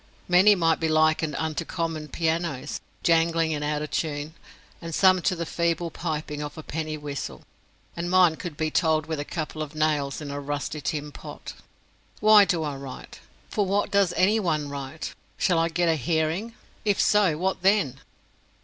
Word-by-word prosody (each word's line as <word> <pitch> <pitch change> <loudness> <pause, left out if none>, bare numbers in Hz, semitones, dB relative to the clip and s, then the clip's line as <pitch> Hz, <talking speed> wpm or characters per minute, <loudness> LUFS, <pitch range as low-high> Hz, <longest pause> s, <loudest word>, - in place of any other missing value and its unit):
Many 185 +4 +6
might 165 -3 +2
be 160 - 0
likened 155 -1 +2
unto 160 +2 -2
common 165 -3 -3
pianos, 160 -4 -2 0.2
jangling 165 -1 +3
and 150 -1 -3
out 150 0 -1
of 150 - -6
tune, 150 -1 -2 0.5
and 165 -2 -5
some 185 -1 +5
to 185 - +1
the 170 -1 -3
feeble 170 0 -1
piping 150 -3 -4
of 150 +1 -6
a 155 - -7
penny 155 0 -4
whistle, 140 - -6 0.5
and 170 +1 -3
mine 180 -3 +5
could 170 -5 -7
be 155 -1 -1
told 160 -3 +2
with 160 -2 -3
a - - -1
couple 155 0 -5
of 155 0 -6
nails 150 -3 0
in 145 -2 -6
a 140 - -4
rusty 145 +1 -4
tin 150 +1 -3
pot. - - -9 0.7
Why 210 -1 +7
do 170 -5 0
I 145 -2 -3
write? 135 -2 -9 0.3
For 205 - +1
what 200 +1 0
does 200 -3 +3
any 210 +4 +4
one 155 -7 -1
write? 140 +2 -6 0.2
Shall 175 -3 +2
I 165 0 +2
get 175 +1 +1
a 165 - +3
hearing? 160 - -1 0.3
If 205 -2 +1
so 200 -7 +3
what 190 +2 -1
then? 185 -9 +2
160 Hz, 180 wpm, -26 LUFS, 150-175 Hz, 0.7 s, Why